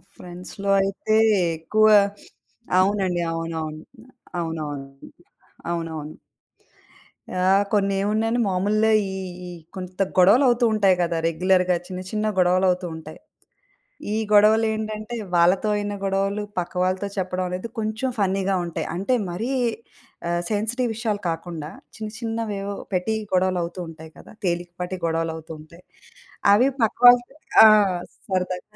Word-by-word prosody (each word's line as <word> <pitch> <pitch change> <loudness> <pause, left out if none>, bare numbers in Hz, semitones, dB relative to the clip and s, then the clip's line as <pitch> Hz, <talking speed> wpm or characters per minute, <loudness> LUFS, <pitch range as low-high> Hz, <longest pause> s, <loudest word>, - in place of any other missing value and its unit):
ఫ్రెండ్స్‌లో 180 +3 -6
అయితే 195 +2 -1 0.4
ఎక్కువ 215 +7 +2 0.9
అవునండి. 190 -2 +1
అవునవును. 160 -2 -4 0.6
అవునవునండి. 145 -4 -6 0.6
అవునవును. 160 -3 -5 1.2
యాహ్! 190 +2 +3
కొన్ని 200 -1 +2
ఏమున్నాయని 220 +3 0
మామూలుగా 210 +4 +1 0.2
ఈ - - -6 0.3
ఈ - - -7 0.3
కొంత 185 +1 -6 0.2
గొడవలు 200 +9 +6
అవుతూ 240 0 +2
ఉంటాయి 195 -3 +4
కదా! 170 -1 -1
రెగ్యులర్‌గా 180 +2 +2
చిన్న 185 -1 -6
చిన్న 215 0 -1
గొడవలవుతూ 180 0 +2
ఉంటాయి. 160 - -10 0.9
ఈ - - 0 0.2
గొడవలేంటంటే 215 +1 +2 0.2
వాళ్ళతో 180 +5 +3
అయిన 205 0 -2
గొడవలు 195 +1 0 0.2
పక్కవాళ్ళతో 185 +2 -1
చెప్పడమనేది 185 +2 -3
కొంచెం 220 +4 -2
ఫన్నీ‌గా 195 0 +1
ఉంటాయి. 170 - -4
అంటే 200 +8 0 0.2
మరీ 220 +9 -3 0.8
ఆహ్, 175 0 0
సెన్సిటివ్ 225 +4 0
విషయాలు 215 -3 -2
కాకుండా 165 -2 -5 0.3
చిన్న 215 -1 -6
చిన్నవేవో 215 -4 -3 0.2
పెట్టి 185 +5 0 0.2
గొడవలవుతూ 180 -1 0
ఉంటాయి 160 0 -12
కదా! - - -14
తేలికపాటి 175 +1 -3
గొడవలవుతూ 160 0 -3
ఉంటాయి. 170 +3 -16 0.7
అవి 245 +6 +5
పక్కవాళ్ళతో 245 +4 +5 0.3
ఆ! - - +11 0.6
సరదాగ 180 -1 -1
185 Hz, 110 wpm, -23 LUFS, 175-215 Hz, 1.2 s, ఆ